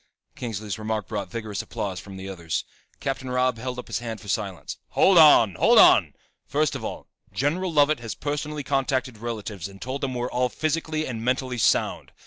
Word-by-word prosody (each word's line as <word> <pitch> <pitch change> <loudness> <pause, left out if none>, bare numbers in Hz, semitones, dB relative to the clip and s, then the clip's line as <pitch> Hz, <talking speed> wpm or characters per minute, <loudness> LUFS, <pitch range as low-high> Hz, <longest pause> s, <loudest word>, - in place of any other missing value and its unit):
Kingsley's 110 -3 -5
remark 110 -1 -2
brought 105 -2 -4
vigorous 110 -4 -4
applause 95 -3 -4
from 95 -1 -10
the 95 0 -7
others. 85 -4 -3 0.4
Captain 135 -1 -3
Robb 125 -1 +1
held 125 +1 -4
up 125 - -6
his - - -3
hand 115 -2 -5
for 105 - -13
silence. 100 -3 -3 0.2
"Hold 190 -3 +6
on! 120 - +7
Hold - - +4
on! - - +7 0.3
First 150 0 +1
of - - -5
all, - - -5 0.3
General 170 +7 0
Lovett 150 -1 +3
has 115 -2 -6
personally 150 0 -3
contacted 130 -4 -1
relatives 105 -6 -5
and 100 0 -14
told 130 +5 -4
them 130 -2 -2
we're 120 0 -1
all 125 0 +1
physically 155 +2 -1
and 115 -3 -5
mentally 125 0 -1
sound. - - +1
125 Hz, 185 wpm, -25 LUFS, 105-140 Hz, 0.4 s, on